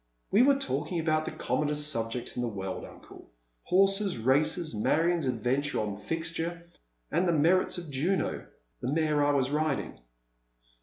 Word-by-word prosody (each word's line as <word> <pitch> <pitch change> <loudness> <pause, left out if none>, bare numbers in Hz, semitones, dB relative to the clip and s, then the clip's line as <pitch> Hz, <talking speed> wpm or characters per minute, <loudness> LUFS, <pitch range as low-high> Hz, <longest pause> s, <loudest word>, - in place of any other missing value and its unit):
" - - -42
We 205 - +5
were 280 +2 +5
talking 165 - -2
about 155 -1 +1
the - - -4
commonest 150 0 0
subjects 115 -1 -3
in 125 - -2
the 120 - -1
world, 95 -3 -5
uncle. - - -14 0.4
Horses, 195 - +3
races, 145 +7 +1
Marion's 165 +8 +1
adventure 130 +4 -1
on 105 -2 -2
Fixture, 165 +6 -3 0.5
and 175 +3 +1
th» 165 -3 +2
merits 180 +5 +3
of 170 -4 -7
Juno 170 +8 -1 0.2
— - - -44
the 125 - -2
mare 155 -1 +2
I 145 - +3
was 135 -1 +1
riding." 155 -1 -1
150 Hz, 160 wpm, -29 LUFS, 130-170 Hz, 0.5 s, We